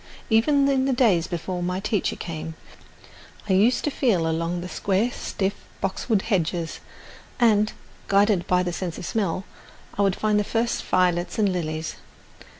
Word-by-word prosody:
Even 275 +5 +4
in 265 -1 +2
the 270 - +2
days 215 -10 +3
before 175 +1 -4
my 180 +1 -1
teacher 205 0 -1
came, 160 -1 -6 0.9
I 190 - +2
used 225 +6 +3
to 295 - 0
feel 205 - +1
along 165 +2 -1
the 180 - -5
square 200 +5 0
stiff 195 -3 -2 0.3
boxwood 195 +2 0
hedges, 175 -5 -1 0.6
and, 215 -3 +4 0.4
guided 200 -2 +3
by 180 0 +3
the 175 -1 -2
sense 170 -1 -4
of - - -6
smell 195 -4 -1 0.6
would 195 -2 +3
find 215 -1 +1
the - - +1
first 230 +3 -1
violets 175 -1 +1
and 210 -2 +3
lilies. 155 -2 -3
195 Hz, 150 wpm, -24 LUFS, 175-220 Hz, 0.9 s, Even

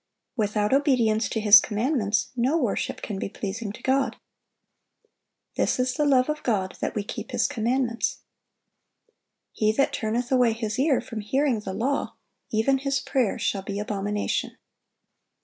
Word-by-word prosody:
(724) 220 -4 +1 0.3
Without 275 +2 +4
obedience 230 -6 +2
to 225 - -2
His 210 0 +9
commandments, 220 -1 0
no 255 +6 +2
worship 245 -10 -2
can 205 -3 -4
be - - -3
pleasing 205 +1 -5
to - - -13
God. 265 +1 +1 1.4
"This - - +1
is 250 0 +1
the 300 +1 0
love 255 -2 +4
of 300 0 -2
God, 190 -6 -1
that - - -2
we 210 - -1
keep - - -7
His - - 0
commandments." 240 -2 -1 1.3
"He 215 0 +1
that 275 +5 +1
turneth 235 +3 -2
away 250 -3 +4
his 220 0 -3
ear 275 -1 +3
from 225 -3 -7
hearing 260 +3 +1
the 190 -2 -6
law, 270 +8 -1 0.3
even 245 +5 +2
his 275 0 0
prayer 250 -7 0
shall 195 - -1
be 195 +1 -5
abomination." 205 0 -2
230 Hz, 155 wpm, -25 LUFS, 210-265 Hz, 1.4 s, His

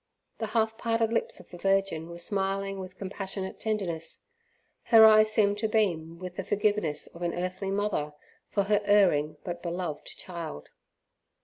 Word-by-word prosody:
The 220 - -2
half 225 0 +1
parted 230 -1 +1
lips - - -1
of - - -15
the 175 - -10
Virgin 195 -4 +1
were 170 - -8
smiling 195 +1 -1
with 185 -1 -8
compassionate 195 0 -5
tenderness; 175 -7 -3 0.6
her 225 -2 +8
eyes 215 0 +7
seemed 205 -2 +2
to 220 - +1
beam 170 -7 0
with 180 0 -8
the 195 - -2
forgiveness 205 -7 0
of 170 - -13
an 175 -1 -1
earthly 185 +2 -3
mother 195 -7 -1 0.3
for 200 - +1
her 205 +1 +2
erring 175 -8 +3
but 175 -1 -5
beloved 170 -3 -4
child. 170 - -7
195 Hz, 155 wpm, -28 LUFS, 170-210 Hz, 0.6 s, her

